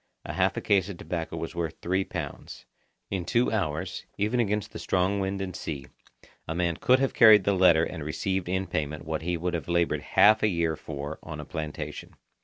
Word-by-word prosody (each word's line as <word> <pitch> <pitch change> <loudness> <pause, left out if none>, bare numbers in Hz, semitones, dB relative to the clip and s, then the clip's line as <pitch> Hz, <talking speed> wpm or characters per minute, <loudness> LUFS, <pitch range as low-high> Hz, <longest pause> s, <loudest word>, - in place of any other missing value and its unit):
A - - -5
half - - +1
a - - -1
case 100 -1 +2
of 95 - -6
tobacco 80 -2 -4
was 80 0 -5
worth 85 -3 -3
three 95 +2 0
pounds. - - -7 0.5
In 95 -2 -1
two 120 +7 +1
hours, 80 -8 -2
even 110 +5 0
against 105 -3 0
the - - -6
strong 95 +2 +1
wind 95 0 -2
and 90 -2 -6
sea, 75 -4 -5 0.6
a 80 - -3
man 85 -1 0
could 130 - +4
have 135 0 0
carried 110 -4 +8
the 100 - +2
letter 90 -4 +5
and 80 -2 -4
received 95 +4 -2
in 95 +1 0
payment 75 -3 -3
what 80 0 -2
he 85 +1 -1
would 90 +2 -2
have 85 - -3
laboured 85 -1 +1
half 110 +1 +5
a - - +4
year 85 -4 0
for 75 0 -6
on 80 -2 -7
a 75 - -6
plantation. 75 -1 -6
90 Hz, 210 wpm, -27 LUFS, 80-100 Hz, 0.6 s, carried